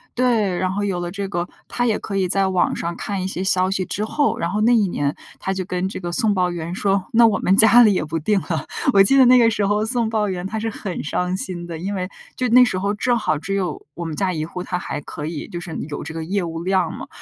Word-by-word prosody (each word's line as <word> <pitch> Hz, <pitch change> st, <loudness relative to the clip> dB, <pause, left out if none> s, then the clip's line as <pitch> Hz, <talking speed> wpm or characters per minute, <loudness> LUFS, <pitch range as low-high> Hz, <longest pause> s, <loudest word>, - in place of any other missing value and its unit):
对， 225 Hz, -7 st, +1 dB
然 185 Hz, 0 st, 0 dB
后 200 Hz, +2 st, -2 dB
有 185 Hz, -3 st, -2 dB
了 175 Hz, 0 st, -4 dB
这 200 Hz, +1 st, -4 dB
个， 175 Hz, -2 st, -3 dB, 0.2 s
她 245 Hz, -, -1 dB
也 225 Hz, -3 st, +1 dB
可 200 Hz, -, -6 dB
以 190 Hz, -, +1 dB
在 195 Hz, +1 st, +3 dB
网 185 Hz, -2 st, +1 dB
上 170 Hz, +1 st, -3 dB
看 200 Hz, +1 st, -4 dB
一 185 Hz, -, -2 dB
些 190 Hz, -1 st, -3 dB
消 185 Hz, -1 st, +3 dB
息 190 Hz, -1 st, -1 dB
之 205 Hz, +3 st, -2 dB
后， 285 Hz, +6 st, 0 dB
然 170 Hz, -, -2 dB
后 210 Hz, +4 st, -1 dB
那 235 Hz, +3 st, +4 dB
一 215 Hz, -4 st, +3 dB
年 145 Hz, -4 st, -1 dB, 0.3 s
她 190 Hz, -, -2 dB
就 190 Hz, -1 st, -3 dB
跟 180 Hz, +1 st, -2 dB
这 -, -, -6 dB
个 175 Hz, -2 st, -5 dB
送 220 Hz, +1 st, +2 dB
报 180 Hz, -2 st, +1 dB
员 170 Hz, 0 st, -5 dB
说， 195 Hz, 0 st, 0 dB
那 230 Hz, 0 st, +6 dB
我 220 Hz, -, +1 dB
们 190 Hz, +2 st, +2 dB
家 230 Hz, +3 st, +8 dB
里 215 Hz, -3 st, +5 dB
也 170 Hz, -, -1 dB
不 160 Hz, +2 st, -3 dB
订 195 Hz, +6 st, +1 dB
了， 165 Hz, -2 st, -3 dB, 0.3 s
我 195 Hz, -1 st, +7 dB
记 270 Hz, +8 st, +4 dB
得 265 Hz, -, +7 dB
那 250 Hz, +1 st, +7 dB
个 230 Hz, -2 st, +5 dB
时 210 Hz, -3 st, 0 dB
候 210 Hz, +1 st, +1 dB
送 230 Hz, -1 st, 0 dB
报 215 Hz, -2 st, 0 dB
员 180 Hz, 0 st, -3 dB
他 220 Hz, -, -4 dB
是 225 Hz, +1 st, -2 dB
很 195 Hz, -4 st, -5 dB
伤 180 Hz, +4 st, -1 dB
心 180 Hz, -2 st, -5 dB
的， 165 Hz, -1 st, -6 dB
因 195 Hz, +4 st, -3 dB
为 185 Hz, 0 st, -3 dB, 0.3 s
就 255 Hz, -, 0 dB
那 250 Hz, +2 st, +7 dB
时 190 Hz, -7 st, 0 dB
候 200 Hz, +2 st, -1 dB
正 240 Hz, +3 st, +1 dB
好 155 Hz, -8 st, 0 dB
只 180 Hz, +6 st, -3 dB
有 190 Hz, -3 st, -3 dB
我 170 Hz, -, -6 dB
们 160 Hz, -2 st, -4 dB
家 190 Hz, +1 st, 0 dB
1 155 Hz, -2 st, -3 dB
户， 180 Hz, +2 st, -6 dB
他 180 Hz, -1 st, -3 dB
还 150 Hz, -, -5 dB
可 150 Hz, +1 st, -7 dB
以 155 Hz, -1 st, -5 dB
就 175 Hz, -, -5 dB
是 175 Hz, -2 st, -7 dB
有 145 Hz, -, -5 dB
这 -, -, -7 dB
个 160 Hz, 0 st, -4 dB
业 195 Hz, +5 st, -1 dB
务 165 Hz, 0 st, -5 dB
量 185 Hz, -2 st, +1 dB
嘛， -, -, -8 dB
190 Hz, 305 characters per minute, -21 LUFS, 175-210 Hz, 0.3 s, 家